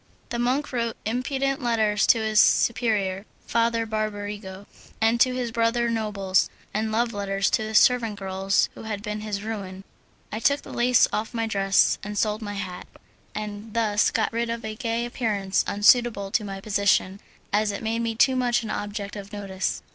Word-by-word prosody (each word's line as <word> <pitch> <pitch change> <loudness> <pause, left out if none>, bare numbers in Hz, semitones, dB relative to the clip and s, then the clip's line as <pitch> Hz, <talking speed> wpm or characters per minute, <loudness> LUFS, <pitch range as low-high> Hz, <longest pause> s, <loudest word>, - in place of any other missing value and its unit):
The 235 - -3
monk 255 +4 0
wrote 235 -2 -1
impudent 265 +4 -1
letters 220 -4 +2
to - - +6
his 220 -1 +2
superior, 215 -6 +2 0.2
Father 230 0 +1
Barbarigo, 205 -2 -4 0.3
and 225 +1 +2
to 255 -1 +4
his 245 -2 -2
brother 235 0 +1
nobles, 200 -4 +1 0.2
and 215 +1 -1
love 230 +1 0
letters 195 -1 -1
to - - +2
the 215 0 -5
servant 230 -2 +4
girls 195 0 +1
who - - -11
had 210 -2 -5
been 210 0 -4
his 210 -2 -4
ruin. 195 -4 -6 0.5
I 215 - -3
took 280 +4 +2
the - - -10
lace 245 0 +4
off 220 +3 -2
my 230 -1 0
dress, 195 -3 +2
and 210 0 -6
sold 215 +1 0
my 205 -1 -5
hat, 185 -3 -6 0.5
and 210 +1 -6
thus 215 -2 +2
got 220 - -1
rid 235 0 -1
of 230 -1 -4
a 215 - -4
gay 230 +1 -2
appearance 210 -6 0
unsuitable 205 -1 +3
to 215 - +1
my 195 -1 -6
position, 200 -1 +1 0.3
as 210 0 +2
it 200 - -6
made 225 +1 -1
me 230 -1 -1
too 260 +3 +4
much 245 -2 +1
an 220 - -4
object 205 0 -4
of 200 -1 -8
notice. 195 -2 -3
215 Hz, 180 wpm, -25 LUFS, 205-230 Hz, 0.5 s, to